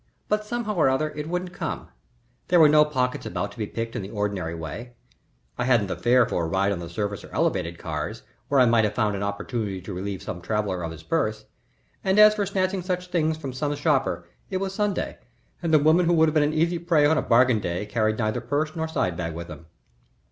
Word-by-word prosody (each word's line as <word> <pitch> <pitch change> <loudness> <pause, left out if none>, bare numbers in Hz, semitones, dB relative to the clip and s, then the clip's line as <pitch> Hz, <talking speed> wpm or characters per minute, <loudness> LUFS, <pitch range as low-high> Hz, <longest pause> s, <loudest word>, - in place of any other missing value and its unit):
But, 210 0 +1
somehow 220 0 -3
or 165 -8 +3
other, 150 +4 0
it 150 +1 -6
wouldn't 180 +1 -3
come. - - -5 0.6
There 175 - +4
were 155 - +8
no 150 0 +6
pockets 130 -4 -1
about 100 - -3
to - - -15
be 105 - -2
picked 115 +1 -5
in 120 - -2
the 95 - -7
ordinary 100 -6 -2
way. 85 +10 -7 0.7
I 125 - +1
hadn't 120 -5 +3
the 95 - -3
fare 125 0 +4
for 85 - -1
a - - -1
ride 95 +4 +1
on 95 - -2
the 85 -1 -7
surface 100 +2 -3
or - - -12
elevated 85 +1 0
cars, 75 -2 -5 0.2
where 140 - +3
I 125 - +7
might 115 -1 +4
have 105 -1 0
found 105 -3 +1
an 100 - -4
opportunity 100 0 -3
to 95 +2 -7
relieve 95 +1 -4
some 90 - -6
traveller 100 -2 -1
of 85 -1 -4
his 80 0 -10
purse, 110 - -1 0.6
and 190 +1 +2
as 210 0 +8
for 205 -2 -1
snatching 190 -1 0
such 180 0 -2
a - - -20
thing 160 -3 +1
from 140 -5 -6
some 145 +3 -1
shopper, 140 - 0 0.2
it 190 - -1
was 195 0 -3
Sunday 205 -1 -2 0.4
and 170 -2 -1
the 155 - +7
women 160 +4 +4
who 175 - +4
would 160 -1 +5
have - - -4
been 155 - +4
an 145 +1 +2
easy 165 +2 +1
prey 165 -3 +3
on 155 +1 +4
a - - +1
bargain 120 -1 +4
day 90 +1 -3
carried 110 0 0
neither 110 +1 -1
purse 150 +5 -1
nor 160 -1 -2
side 95 - -1
bag 85 -2 -4
with 85 0 -7
them. 80 +1 -10
125 Hz, 240 wpm, -25 LUFS, 100-160 Hz, 0.7 s, were